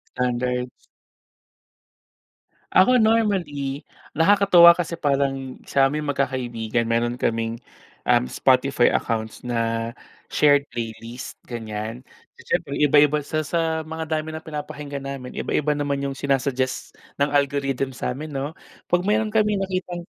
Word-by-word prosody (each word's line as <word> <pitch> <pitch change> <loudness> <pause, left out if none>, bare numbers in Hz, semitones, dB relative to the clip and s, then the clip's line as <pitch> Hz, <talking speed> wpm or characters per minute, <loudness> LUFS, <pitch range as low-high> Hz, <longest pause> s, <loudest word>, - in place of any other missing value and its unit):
Standard. 125 0 -1 2.0
Ako 250 +6 +5
normally, 175 -11 +1 0.3
nakakatuwa 175 -1 +7
kasi 170 -1 -2
parang 135 -4 -1
sa'ming 140 +2 +1
magkakaibigan 120 -5 -1
meron 120 +1 0
kaming, 115 0 -1 0.5
um, 65 - +3
Spotify 130 - +3
accounts 110 -1 -2
na 115 -1 -1 0.4
shared 145 -1 +3
playlist, 115 +1 -7
ganyan. 115 +1 -5 0.3
Siyempre 140 - -2
iba-iba 150 0 +4
sa 155 +1 -1
sa 160 +1 -1
mga 160 +1 -5
dami 155 0 -2
ng 160 - -11
pinapakinggan 150 -2 -6
namin, 135 -2 -6
iba-iba 150 0 0
naman 145 -1 -1
yung 135 - -2
sina-suggest 135 -1 -1 0.2
ng 140 +1 +1
algorithm 140 -2 0
sa'min 135 +4 -5
'no. 140 +2 -4 0.3
Pag 175 0 +2
meron 215 +2 0
kami 210 -2 +2
nakitang 185 -2 -3
140 Hz, 115 wpm, -23 LUFS, 125-160 Hz, 2.0 s, nakakatuwa